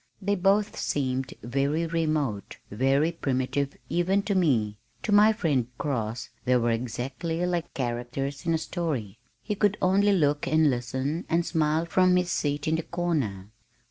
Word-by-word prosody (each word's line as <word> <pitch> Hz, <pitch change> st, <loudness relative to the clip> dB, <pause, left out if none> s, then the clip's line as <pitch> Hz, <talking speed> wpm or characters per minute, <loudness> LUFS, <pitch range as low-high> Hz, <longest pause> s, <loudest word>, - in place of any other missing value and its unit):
They 200 Hz, 0 st, 0 dB
both 200 Hz, +2 st, +2 dB
seemed 130 Hz, -2 st, -1 dB
very 140 Hz, +6 st, 0 dB
remote, 155 Hz, -10 st, -1 dB
very 135 Hz, +8 st, +2 dB
primitive 140 Hz, -2 st, -1 dB
even 180 Hz, +5 st, +1 dB
to 205 Hz, -, -1 dB
me, 115 Hz, -, +1 dB, 0.2 s
to 215 Hz, -, -2 dB
my 210 Hz, +1 st, +7 dB
friend 150 Hz, -, 0 dB
Cross 120 Hz, -5 st, -3 dB
they 125 Hz, -1 st, +3 dB
were 120 Hz, -1 st, +1 dB
exactly 130 Hz, +9 st, -2 dB
like 175 Hz, -2 st, -2 dB
characters 130 Hz, +5 st, -3 dB
in 165 Hz, -, +3 dB
a -, -, +2 dB
story. 145 Hz, -, -3 dB, 0.2 s
He 210 Hz, -, -2 dB
could 205 Hz, 0 st, +1 dB
only 200 Hz, +3 st, +3 dB
look 150 Hz, -6 st, +2 dB
and 155 Hz, +1 st, +4 dB
listen 130 Hz, +6 st, -2 dB
and 170 Hz, +1 st, +2 dB
smile 160 Hz, -1 st, +1 dB
from 185 Hz, +1 st, +3 dB
his 180 Hz, -1 st, +1 dB
seat 145 Hz, -1 st, -1 dB
in 160 Hz, +1 st, +2 dB
the -, -, -1 dB
corner. 140 Hz, -, -2 dB
150 Hz, 155 wpm, -27 LUFS, 130-175 Hz, 0.2 s, my